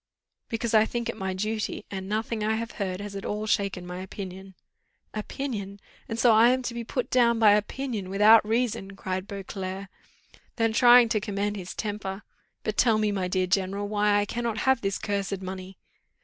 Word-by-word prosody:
"Because 230 0 -2
I 215 -1 +7
think 235 +1 -3
it - - -3
my 190 -1 -3
duty, 215 +3 -3
and 190 -1 -5
nothing 220 +1 -2
I 220 +1 +1
have 230 +1 -4
heard 185 -1 -2
has 205 -1 -7
at 195 - -5
all 210 +1 -3
shaken 195 -4 0
my 180 +1 -6
opinion." 190 0 -8 0.6
"Opinion! 210 -3 -5 0.3
and 225 - -3
so 230 -1 +5
I 225 +2 +7
am 255 +1 +1
to 240 - -3
be 235 0 -4
put 250 +2 -3
down 235 -2 +4
by 220 -2 +6
opinion, 210 -1 -1
without 210 +3 +6
any 210 - -9
reason!" 225 -4 -1
cried 185 0 -4
Beauclerc. 195 -1 -6 0.7
Then 225 -1 +1
trying 240 +1 +7
to 220 -2 +1
command 205 0 -2
his 185 -2 -7
temper, 205 -2 -4 0.4
"But 215 - -3
tell 225 -3 +4
me, 215 -1 +1
my 190 -2 -1
dear 185 0 +1
general, 195 +2 0
why 210 0 +2
I 205 - +1
cannot 230 0 -3
have 265 -2 +3
this 195 -1 -1
cursed 200 -1 -3
money?" 185 0 -7
210 Hz, 190 wpm, -27 LUFS, 195-225 Hz, 0.7 s, I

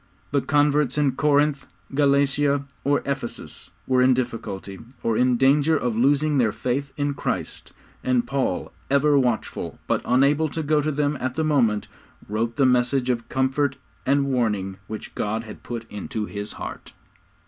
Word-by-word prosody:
The 140 0 +2
converts 145 -2 +2
in 145 -2 +3
Corinth, 145 +1 +2 0.3
Galatia, 140 0 +2 0.2
or 145 +1 +2
Ephesus, 140 -4 -4 0.2
were 130 -1 +3
in 130 0 +5
difficulty, 105 -6 -4 0.2
or 115 - +1
in 125 +1 +3
danger 145 +5 +4
of 120 -5 -1
losing 145 +4 +3
their 115 -4 +3
faith 135 +5 -2
in 145 0 0
Christ, - - -4 0.3
and 125 -2 +2
Paul, 130 -12 -2 0.2
ever 140 +1 +4
watchful, 120 -4 -2
but - - 0
unable 140 +5 +3
to 160 +2 -3
go 150 0 +2
to 155 +1 -1
them 145 0 0
at 130 0 -2
the 160 - 0
moment, 120 -9 +2 0.4
wrote 115 +3 -1
the 140 - +3
message 125 +1 +2
of 115 -1 -4
comfort 130 +1 +1 0.3
and 140 +1 +2
warning 105 -8 0
which 110 0 -7
God 110 +2 -2
had 110 - -10
put 115 -1 -6
into 105 +1 -4
His 105 0 -5
heart. - - -8
135 Hz, 160 wpm, -24 LUFS, 120-145 Hz, 0.4 s, in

